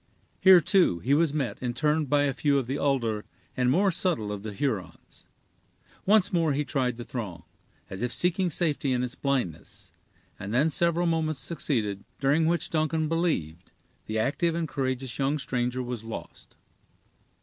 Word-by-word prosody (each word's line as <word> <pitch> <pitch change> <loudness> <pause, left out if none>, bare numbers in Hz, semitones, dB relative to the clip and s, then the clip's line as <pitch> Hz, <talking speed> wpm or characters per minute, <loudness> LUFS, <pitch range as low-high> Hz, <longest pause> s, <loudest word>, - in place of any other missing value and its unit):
Here, 185 -2 +8
too, 175 - +3
he 120 +12 0
was 160 0 +3
met 140 -5 -2
and 120 -1 -2
turned 150 +1 +1
by 145 -1 +3
a 140 -2 +1
few 140 +1 +1
of 135 - 0
the 135 +4 -3
older 115 -7 0 0.3
and 125 -1 +2
more 190 +8 +3
subtle 160 - -1
of 105 -1 -5
the 110 +1 -6
Hurons. 100 - -5 0.8
Once 205 -2 +4
more 165 -4 +2
he 145 +2 -1
tried 125 -3 -1
the 120 - -6
throng, 100 -10 -6 0.4
as 95 - -7
if 125 0 -1
seeking 180 - +2
safety 150 -4 0
in 125 0 0
its 125 0 -4
blindness, 135 - -3 0.5
and 100 +4 -4
then 150 +5 +3
several 170 +3 +2
moments 160 -3 0
succeeded, 115 - -2 0.2
during 145 +4 +2
which 170 +1 0
Duncan 155 0 0
believed 150 - -1 0.4
the 110 - -2
active 160 +9 0
and 170 -1 -1
courageous 130 -3 -3
young 140 +2 +1
stranger 125 -2 -2
was 120 -2 -5
lost. 115 0 -9
140 Hz, 170 wpm, -27 LUFS, 120-160 Hz, 0.8 s, Here